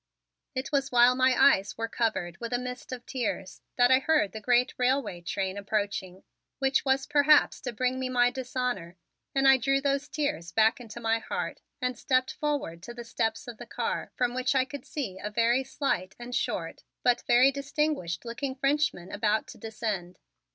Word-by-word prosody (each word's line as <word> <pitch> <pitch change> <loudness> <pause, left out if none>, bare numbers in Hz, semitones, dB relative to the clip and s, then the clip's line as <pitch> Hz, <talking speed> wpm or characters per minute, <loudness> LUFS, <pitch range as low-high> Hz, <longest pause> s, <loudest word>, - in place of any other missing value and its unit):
It 260 +1 -3
was 275 -1 0
while 245 0 +6
my 255 0 +3
eyes 200 -8 +4
were 225 0 -2
covered 215 -7 -2
with 235 +1 -5
a - - +3
mist 250 0 -6
of 250 -1 -6
tears 230 -7 -4
that 245 0 +4
I 260 - +7
heard 285 -8 +2
the 220 - -7
great 245 +3 +3
railway 250 -8 +1
train 190 +2 -3
approaching, 200 -2 -3 0.3
which 270 0 +2
was 270 0 +1
perhaps 295 0 +4
to 245 - -4
bring 255 +3 -1
me 260 0 -2
my 245 -1 +3
dishonor, 250 -9 -3 0.4
and 270 0 +4
I 270 0 +8
drew 275 +2 +1
those 280 0 0
tears 175 - -2
back 220 +4 +3
into 235 -1 -9
my 225 0 +1
heart - - -4 0.2
and 250 -1 -1
stepped 255 +1 +1
forward 285 - -2
to 240 +6 -9
the 240 - -7
steps 225 0 -2
of 235 -3 -8
the 240 - -9
car - - -3
from 245 -1 0
which 255 +2 0
I 260 -1 +3
could 285 +1 -9
see 200 -11 -4
a 210 - -4
very 235 +4 +2
slight 260 -9 -2
and 240 +1 -8
short - - -2 0.2
but 245 -1 +3
very 250 +3 +6
distinguished 280 - -2
looking 260 +3 -4
Frenchman 275 -9 0
about 210 +1 +1
to - - -11
descend. 210 -5 -4
245 Hz, 185 wpm, -28 LUFS, 215-265 Hz, 0.4 s, I